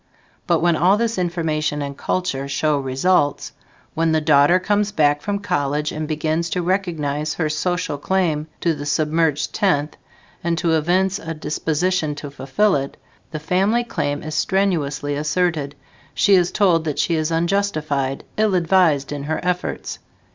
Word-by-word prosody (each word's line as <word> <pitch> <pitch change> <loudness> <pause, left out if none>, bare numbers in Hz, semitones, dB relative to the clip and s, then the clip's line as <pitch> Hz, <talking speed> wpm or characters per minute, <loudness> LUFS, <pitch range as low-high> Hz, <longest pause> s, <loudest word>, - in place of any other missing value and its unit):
But - - +2
when 170 -1 +3
all 185 +6 +4
this 230 -2 -1
information 155 -4 -1
and 140 0 -5
culture 140 -5 -2
show 145 +1 0
results, 140 +3 +1 0.4
when 165 0 +1
the 160 - +3
daughter 150 +2 +5
comes 205 +2 0
back 145 -5 +2
from 205 +5 -2
college 150 -6 -1
and 155 0 -4
begins 155 +2 -1
to 180 +2 -1
recognize 155 -5 -1
her 160 -3 -1
social 155 -1 -2
claim 160 -3 0
to 170 - +2
the 145 -1 -6
"submerged 155 0 0
tenth", 155 -7 +1 0.5
and 170 0 0
to 170 0 +1
evince 180 +5 +1
a 165 0 -6
disposition 155 +1 -1
to 145 -1 -8
fulfill 165 +10 +1
it, 140 -1 -3 0.3
the 155 - -5
family 195 +9 +1
claim 145 -10 -3
is 155 0 -5
strenuously 155 -8 0
asserted; 150 -1 -1 0.4
she 200 - +4
is 180 -2 +4
told 180 -6 +3
that 150 -3 -2
she 170 - +1
is 155 -1 0
unjustified, 165 -6 -1
ill 215 -3 +2
advised 170 -6 +2
in 145 -1 -4
her 155 +1 -1
efforts. 180 0 -3
160 Hz, 155 wpm, -21 LUFS, 150-180 Hz, 0.5 s, daughter